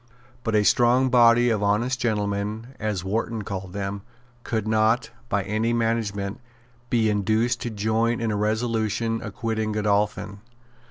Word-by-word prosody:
But 115 -1 0
a 105 - +4
strong 125 +5 +4
body 120 0 +5
of 105 -2 0
honest 115 +5 +1
gentlemen, 105 +1 -2
as 105 -4 -2
Wharton 110 +2 -2
called 95 -2 -6
them, 100 0 -4 0.4
could 110 -2 -2
not, 110 +3 +2 0.2
by 100 -1 +1
any 110 +4 0
management, 110 -4 -1 0.5
be 115 -2 +2
induced 110 +3 +1
to 120 - -2
join 110 +2 0
in 115 -1 -1
a - - -1
resolution 110 +1 0
acquitting 110 0 -3
Godolphin. 105 -1 0
110 Hz, 140 wpm, -24 LUFS, 105-115 Hz, 0.5 s, body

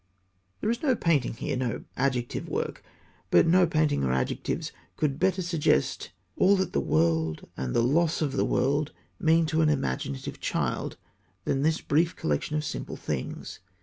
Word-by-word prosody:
_ - - -44 0.6
There 220 - +1
is 235 - -2
no 265 -5 +3
painting 155 - +1
here, 140 +3 -3
no 125 -2 -2
adjective 125 -3 -1
work. - - -3 0.5
But 85 - +6
no 180 +2 +5
painting 155 - +1
or 65 - +1
adjectives 65 0 -1 0.3
could 145 -2 0
better 185 0 +2
suggest 160 - +1 0.3
all 195 +2 +5
that 190 -2 -1
the - - +2
world 80 0 +1
and 65 -1 -3
the 115 - +4
loss 160 +6 +2
of 150 -4 0
the - - +1
world 145 +3 +1 0.3
mean 165 0 +4
to 160 +1 +1
an 155 - +4
imaginative 70 - -2
child - - -2 0.5
than 135 - +1
this 160 +2 +1
brief 165 +4 +1
collection 75 - -1
of 150 - -2
simple - - -4
things. 70 -4 -5
150 Hz, 170 wpm, -27 LUFS, 115-165 Hz, 0.6 s, But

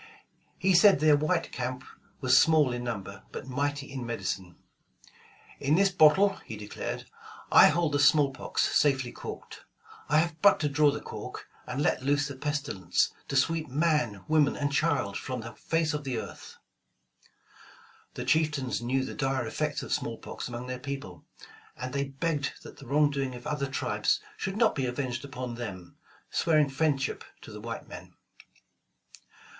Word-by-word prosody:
He 190 0 +2
said 190 -1 +7
their 155 0 +5
white 155 +4 0
camp 125 +1 -4 0.4
was 130 -1 +4
small 150 -3 +5
in 120 0 -4
number, 100 -4 -5
but - - -7
mighty 140 +1 -2
in 130 -2 -5
medicine, 95 -6 -4 1.0
'*In 145 +3 +2
this 195 +2 +4
bottle,'' 190 +4 +5
he 110 - -7
declared, 105 0 -5 0.5
I - - +9
hold 170 -3 +1
the 145 - +1
smallpox 140 -2 +2
safely 135 -4 +2
corked. - - -9 0.5
I 150 - +4
have 165 0 0
but 200 - +6
to 150 - +1
draw 145 +1 +4
the 145 - -3
cork, - - -8 0.2
and 135 +3 -2
let - - +1
loose 145 +2 +1
the 140 - -7
pestilence 140 - -1
to 140 - -4
sweep 160 +4 +1
man. 140 - +1
woman 150 -2 +3
and 145 -1 -1
child 140 -10 +1
from 130 -2 -4
the 115 0 -8
face 160 +7 -1
of 150 0 -3
the 130 -3 -3
earth." - - -8 1.6
The - - -4
chieftans 150 -6 +1
knew 130 +2 0
the - - -6
dire 135 -3 -1
effects 110 - -2
of - - -3
smallpox - - -4
among 120 0 -6
their 125 0 -5
people, 135 - -7 0.5
and 130 0 -5
they 140 0 0
begged 145 +1 -2
that - - -12
the 140 -3 -12
wrong 145 +2 +3
doing 135 -2 -2
of 120 - -11
other 150 -2 -2
tribes 135 - 0 0.2
should 190 +1 -4
not 225 -1 +4
be 135 -2 -1
avenged 125 0 -3
upon 130 -3 -6
them, 100 -7 -7 0.4
swearing 155 -3 +3
friendship 140 -1 0 0.2
to - - -10
the - - -9
white - - -6
men. - - -11
140 Hz, 165 wpm, -28 LUFS, 125-150 Hz, 1.6 s, I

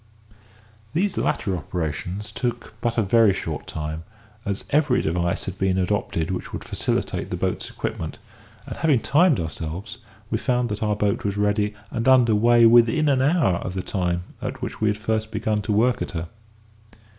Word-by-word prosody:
These 190 +4 +1
latter 95 -3 0
operations 90 +5 -4
took 120 0 -3
but 120 0 -1
a 115 - +3
very 105 -1 +4
short 80 -5 -4
time, 80 +1 -4 0.4
as 100 -1 -2
every 145 -3 +3
device 85 +2 0
had 95 0 -6
been 95 -1 +1
adopted 90 -3 -1
which 90 - -4
would - - -5
facilitate - - -2
the - - -3
boat's - - -2
equipment; - - -4 0.5
and, - - -7
having 150 -7 +3
timed 150 - +3
ourselves, 85 +7 -5 0.3
we 110 - +1
found 125 -2 0
that 105 0 -4
our 105 -1 +1
boat 105 -1 0
was 100 0 -2
ready 105 0 +1 0.2
and 115 +2 -2
under 125 -4 +6
weigh 120 +2 +5
within 120 +6 +5
an 135 -2 +3
hour 145 - +3
of 90 +1 -5
the 95 - -2
time 90 -2 -1 0.2
at - - -4
which - - -6
we 110 - +3
had 105 0 +1
first 110 0 -1
begun 110 -1 -1
to 105 - -3
work 115 +3 +2
at - - -4
her. 85 +1 -4
105 Hz, 180 wpm, -23 LUFS, 95-120 Hz, 0.5 s, under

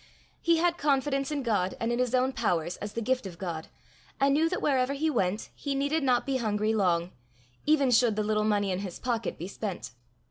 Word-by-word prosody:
He 335 -1 +3
had 345 +1 +1
confidence 275 -1 +1
in 290 -2 -2
God 205 -6 0
and 230 +1 -1
in 240 - 0
his 250 0 +1
own 255 +1 +2
powers 175 -7 0
as 205 0 -6
the 230 - -3
gift 255 -2 0
of 175 -3 -10
God, 165 -4 -5 0.5
and 275 0 +4
knew 320 +3 +3
that 365 - -2
wherever 265 -1 +1
he 310 +3 0
went 205 -4 -1
he 280 -1 -3
needed 285 +4 +1
not 250 -3 +2
be 270 -1 0
hungry 215 -2 0
long, 180 -4 +1 0.6
even 285 -4 +4
should 230 -2 +4
the 215 - 0
little 215 0 +1
money 205 -2 +1
in 180 - -1
his 190 -3 -5
pocket 230 -4 -2
be 175 - -5
spent. 195 - -5
235 Hz, 215 wpm, -28 LUFS, 205-275 Hz, 0.6 s, and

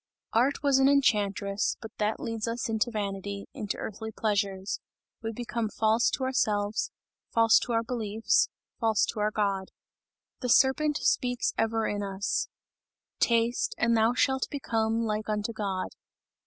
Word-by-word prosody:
Art 260 +6 +2
was 275 -2 +4
an 270 +1 +5
enchantress, 205 -7 +1
that 220 - -9
but 215 +1 0
leads 225 -1 -3
us 230 +1 -2
into 225 +1 0
vanity, 200 -2 -4
into 205 -2 -4
earthly 220 +1 -5
pleasures. 200 -3 -1 0.4
We 225 0 -3
become 225 -1 -3
false 220 +2 +2
to 265 - -5
ourselves, 210 -5 0 0.4
false 225 -1 +5
to 240 - -3
our 230 0 +2
friends, 225 -2 +1 0.3
false 220 -3 +3
to - - -6
our 210 0 +2
God. 200 -3 -1 0.7
The 250 - -3
serpent 285 +4 +4
speaks 245 -1 +1
ever 225 0 +1
in 205 0 -1
us: 195 0 -1 0.7
"Taste 235 +1 +2
and 235 -1 +3
thou 225 +2 +3
shalt 265 0 +2
become 225 -4 0
like 215 -1 -2
unto 210 +2 -1
God." 195 -4 -2
220 Hz, 145 wpm, -28 LUFS, 205-235 Hz, 0.7 s, an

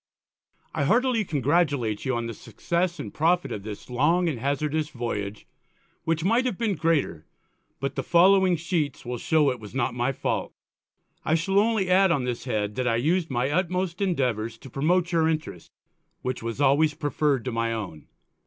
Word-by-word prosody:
_ - - 0
_I 140 - +1
heartily 245 - +3
congratulate 145 - 0
you 130 -1 0
on 120 0 -2
the 115 - -4
Success 175 - -2
and - - -6
Profit 175 +3 +1
of 100 - -4
this 105 0 -8
Long 155 +8 +2
and 145 -8 -2
Hazardous 150 +3 -1
Voyage; 105 -6 -4 0.6
which 165 -1 0
might 230 +7 +2
have 205 - -3
been 225 -4 0
greater, 150 - 0 0.5
but 135 +2 -2
the 135 - -2
following 185 +4 +5
Sheets 160 -5 -2
will 120 0 -4
show 150 -1 +3
it 125 - -5
was 105 +2 -11
not 125 -3 0
my 120 +2 0
fault._ 135 - -2 0.8
_I 160 - +4
shall 195 +4 +2
only 215 -3 +2
add 190 +1 +5
on 145 -6 +1
this 125 -1 -3
Head, 105 -4 -1
that 130 -1 0
I 115 - +2
used 165 +8 +1
my 130 +1 0
utmost 180 +2 -1
Endeavours 125 - 0
to 130 - -13
promote 175 +6 +1
your 165 -2 +3
Interest, 155 - -4 0.5
which 130 0 -3
was 115 +2 -4
always 145 +2 +3
prefer'd 145 -3 0
to 125 - -2
my 115 0 -1
own. 100 -9 -6
145 Hz, 180 wpm, -26 LUFS, 120-175 Hz, 0.8 s, following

